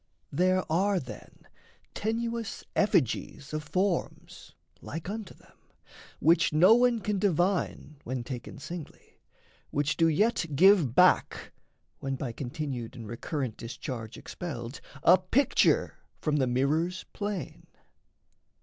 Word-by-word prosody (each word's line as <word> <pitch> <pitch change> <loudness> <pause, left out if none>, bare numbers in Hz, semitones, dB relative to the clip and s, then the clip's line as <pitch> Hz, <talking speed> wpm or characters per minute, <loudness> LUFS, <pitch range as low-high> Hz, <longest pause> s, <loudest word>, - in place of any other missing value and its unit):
There 185 +4 +2
are, 190 +4 +2
then, 120 -8 -11 0.5
tenuous 230 +1 -3
effigies 140 - 0
of 155 0 -2
forms, 180 +4 -2 0.3
Like 160 +2 -6
unto 210 -1 -6
them, - - -23 0.6
which 170 +2 +4
no 175 +8 +7
one 240 -1 +3
can 205 -1 -1
divine 180 -4 0
When 125 0 -3
taken 120 -1 -7
singly, 155 +3 -9 0.5
which 145 +1 0
do 165 - +4
yet 185 +3 +2
give 175 - +5
back, - - +3 0.5
When 135 0 -3
by 130 -2 -4
continued 125 -1 -5
and 115 -3 -8
recurrent 125 +1 -4
discharge 115 -1 -6
Expelled, 145 -7 -7 0.2
a 180 +2 +7
picture 230 +10 +2 0.2
from 150 -1 0
the 130 -3 +2
mirrors' 150 +9 0
plane. 205 -3 -5
165 Hz, 115 wpm, -29 LUFS, 135-195 Hz, 0.6 s, no